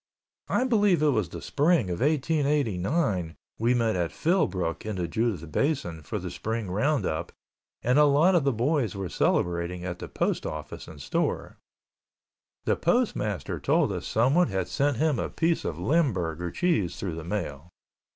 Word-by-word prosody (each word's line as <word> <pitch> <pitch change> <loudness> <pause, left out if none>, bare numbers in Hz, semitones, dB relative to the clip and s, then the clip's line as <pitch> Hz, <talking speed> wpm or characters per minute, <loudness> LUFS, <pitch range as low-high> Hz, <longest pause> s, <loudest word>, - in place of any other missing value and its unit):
I - - +1
believe 205 - +3
it 150 - +5
was 110 -10 +1
the - - -8
Spring 145 - +2
of 85 - -3
1889 140 - +1 0.2
we 120 +3 +3
met 115 -3 +1
at 85 -2 -1
Philbrook 95 - 0
in 110 -1 -4
the 90 -2 -2
Judith 90 -4 -2
Basin 135 - -1
for 75 - -4
the - - -5
Spring 110 -3 -3
roundup 105 - 0 0.5
and 125 +5 +3
a 150 - +7
lot 150 +6 +4
of 170 -5 +3
the 140 - +2
boys 125 - 0
were 95 -2 -4
celebrating 85 +1 0
at 90 -1 -4
the - - -6
Post - - -1
Office 75 -1 -7
and 75 - -11
store. 70 - -2 1.1
The - - +2
postmaster 110 - 0
told - - +2
us - - -4
someone 135 +10 +3
had 95 -2 -2
sent 140 -2 0
him 155 -2 +1
a - - -2
piece 165 0 0
of 80 - -3
limburger 90 - 0
cheese 100 - 0
through 95 -4 -4
the 80 0 -6
mail. 85 -4 -4
110 Hz, 165 wpm, -27 LUFS, -, 1.1 s, a